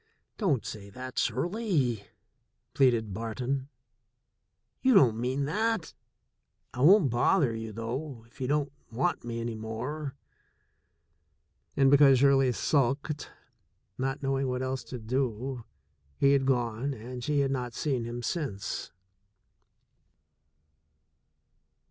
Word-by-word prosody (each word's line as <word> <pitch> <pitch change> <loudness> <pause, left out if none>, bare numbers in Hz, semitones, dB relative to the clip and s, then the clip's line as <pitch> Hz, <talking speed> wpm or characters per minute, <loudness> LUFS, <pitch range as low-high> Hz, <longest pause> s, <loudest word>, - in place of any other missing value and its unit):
"Don't 160 - +1
say 100 -2 -7
that, 130 +4 -5
Shirley," 140 - 0 0.7
pleaded 115 -6 +3
Barton. 125 +5 -3 1.1
"You 260 -2 +4
don't 125 - +6
mean 130 +4 -1
that. 215 +3 -1 0.8
I 125 - -4
won't 170 - +6
bother 120 +2 +3
you, 110 0 -5
though, 115 +3 -5
if 120 - -17
you 130 - -1
don't 145 0 0 0.2
want 135 +10 0
me 115 0 -4
any 115 0 -3
more." 125 +7 -5 1.6
And 135 -1 +5
because 140 -2 +7
Shirley 135 -1 +4
sulked, 140 +3 0 0.7
not 135 +2 -2
knowing 135 0 0
what 125 0 -2
else 130 0 -2
to 125 - -6
do, 125 +1 -2 0.5
he 140 0 +4
had 135 -1 +2
gone 125 +1 0
and 125 +2 -8
she 145 +2 +1
had 135 -1 +1
not 125 -3 -3
seen 135 -6 -1
him 120 +1 -5
since. 115 - -3
130 Hz, 115 wpm, -29 LUFS, 115-140 Hz, 1.6 s, because